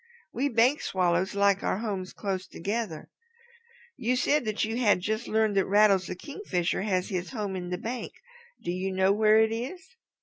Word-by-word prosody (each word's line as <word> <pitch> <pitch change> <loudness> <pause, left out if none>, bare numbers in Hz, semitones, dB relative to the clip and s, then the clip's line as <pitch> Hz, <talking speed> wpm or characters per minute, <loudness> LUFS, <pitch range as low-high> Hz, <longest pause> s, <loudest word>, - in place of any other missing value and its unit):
"We 275 +4 0
Bank 245 +4 +3
Swallows 185 +1 0
like 200 -1 +3
our - - 0
homes 195 -4 -4
close 190 -2 -4
together. 200 -3 -4 0.9
You 250 0 0
said 285 +2 +2
that 215 0 0
you 225 +2 -3
had 215 -6 +3
just 215 +4 -2
learned 220 -1 +1
that 195 - +2
Rattles 200 -2 +4
the - - -4
Kingfisher 185 - -2
has 185 -2 0
his 185 -3 -3
home 210 -6 -4
in 180 -1 -5
a 180 - -1
bank. 235 +6 -5 0.5
Do 175 - -2
you 185 +2 -2
know 190 +1 +3
where 215 +1 +5
it 220 0 +2
is?" 270 +12 -5
205 Hz, 180 wpm, -28 LUFS, 185-230 Hz, 0.9 s, where